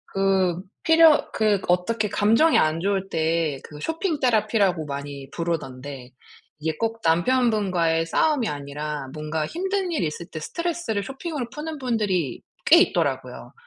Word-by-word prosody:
그 190 -2 +2 0.2
필요 325 -1 +5
그 210 -2 +2
어떻게 210 +5 +1
감정이 225 +11 +3
안 155 +1 +1
좋을 195 0 -1
때 160 -3 0
그 150 -1 -11
쇼핑 325 -1 -2
테라피라고 210 - +2
많이 140 -1 -6
부르던데. 140 -6 -5 0.5
이게 155 +1 -2
꼭 225 0 -2
남편분과의 180 -3 +2
싸움이 275 - +1
아니라 145 0 -5
뭔가 155 0 -3
힘든 380 +1 -2
일이 310 - 0
있을 165 +3 -7
때 155 - -7
스트레스를 335 - -3
쇼핑으로 270 - -5
푸는 305 +2 -6
분들이 210 - -1 0.2
꽤 340 - +8
있더라고요. 370 - -1
195 Hz, 310 characters per minute, -24 LUFS, 160-255 Hz, 0.5 s, 꽤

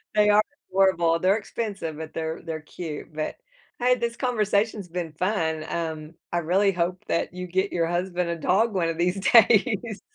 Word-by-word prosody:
They 210 0 +5
are 210 +1 +6 0.3
adorable. 175 -4 +3
They're 190 +4 +3
expensive, 200 -7 -4
but 160 0 -7
they're 160 0 -3
they're 160 -1 -5
cute. 155 0 -7
But, 155 0 -3 0.4
hey, 250 +1 +4
this 235 -1 -2
conversation's 215 -4 0
been 170 -1 -4
fun, 160 -3 -1
um, 160 -2 -4 0.2
I 175 - +1
really 190 +4 +2
hope 180 +1 -2
that 170 - -1
you 180 0 -6
get 190 +3 0
your 165 -1 0
husband 175 0 -1
a 170 - -1
dog 200 +7 +2
one 175 -3 +1
of 165 - -3
these 180 +3 +1
days. 225 -1 +4
180 Hz, 175 wpm, -25 LUFS, 165-210 Hz, 0.4 s, are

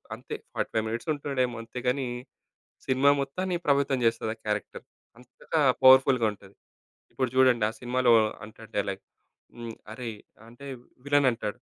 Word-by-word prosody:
అంతే, - - -7 0.2
45 110 -1 -1
మినిట్స్ 115 +8 -4
ఉంటుండేమో 135 -4 -2
అంతేగానీ, 125 +3 -2 0.8
సినిమా 130 +2 +4
మొత్తాన్ని 180 +7 -2
ప్రభావితం 140 -2 +2
జేస్తది 115 -1 +1
ఆ - - -41
క్యారెక్టర్. 105 -1 -3 0.3
అంతగా 125 +6 -4 0.2
పవర్‌ఫుల్‌గా 130 -2 +7
ఉంటది. 100 -1 -17 0.6
ఇప్పుడు 130 -2 -1
జూడండి 130 -4 +5
ఆ - - -9
సినిమాలో 125 0 +2 0.3
అంటాడు 110 +1 -14
డైలాగ్ 100 -1 -2 0.5
హ్మ్. 115 -1 -7 0.2
అరెయ్! 115 -1 -6 0.3
అంటే 120 +4 -13 0.4
విలనంటాడు. 125 -6 +1
125 Hz, 125 wpm, -27 LUFS, 115-135 Hz, 0.8 s, పవర్‌ఫుల్‌గా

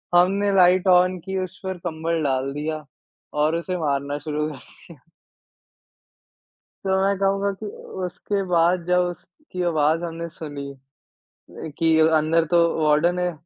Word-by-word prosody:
हमने 195 +3 +3
light 185 0 +5
on 180 0 +4
की, 190 0 -3
उस 185 +2 -8
पर 190 -1 -3
कंबल 165 0 -2
डाल 135 0 0
दिया 155 +1 -4 0.6
और 155 +2 +2
उसे 180 +2 -3
मारना 145 -2 -1
शुरू 150 +1 -2
कर 150 - -8
दिया। 170 +5 -17 1.9
तो 190 0 +1
मैं 195 0 +1
कहूँगा 195 +1 +1
कि - - -4 0.4
उसके 200 +3 -3
बाद 175 0 +2
जब 180 0 +3
उसकी 180 - -9
आवाज़ 160 0 +1
हमने 170 0 -5
सुनी 145 -3 -7 1.1
कि 160 -1 +3 0.2
अंदर 160 +2 +2
तो 175 - +4 0.3
वार्डन 160 +4 +3
है। 180 -1 0
170 Hz, 140 wpm, -23 LUFS, 155-185 Hz, 1.9 s, light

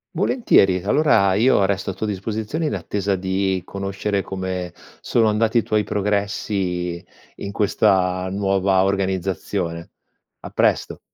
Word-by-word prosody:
Volentieri, 95 - +3
allora 105 -5 +3
io 110 -1 +4
resto 95 0 -1
a 95 - -2
tua 110 - -3
disposizione 110 - -3
in - - -1
attesa 100 -1 -2
di 95 0 -1
conoscere 100 +1 -2
come 95 -2 -4 0.3
sono 115 -2 +2
andati 110 +2 +2
i 115 - +3
tuoi 105 -1 +1
progressi 95 -3 -2 0.3
in 100 - -5
questa 95 -2 +1
nuova 95 -1 +1
organizzazione. 95 -3 -2 0.5
A - - -9
presto. - - +1
95 Hz, 125 wpm, -21 LUFS, 95-105 Hz, 0.5 s, io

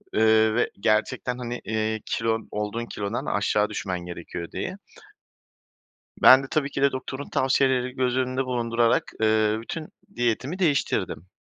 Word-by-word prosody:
ııı, 110 0 +4
ve 120 - +1
gerçekten, 120 +4 0
hani, 120 -1 -5
iii, 110 0 -1
kilon 115 -1 -1
olduğun 105 +3 -3
kilodan 105 0 -4
aşağı 105 0 +1
düşmen 95 -4 -3
gerekiyor 85 -1 -7
diye. - - -4 1.4
Ben 130 +1 +8
de - - -6
tabii 145 -2 0
ki 135 - -3
de 140 - +4
doktorun 130 +2 -6
tavsiyelerini 130 -1 +2
göz 125 -1 0
önünde 130 0 0
bulundurarak, 115 -1 +1
eee, 110 0 +3
bütün 155 +7 -6 0.3
diyetimi 120 - -1
değiştirdim. 140 - 0
115 Hz, 135 wpm, -25 LUFS, 110-130 Hz, 1.4 s, Ben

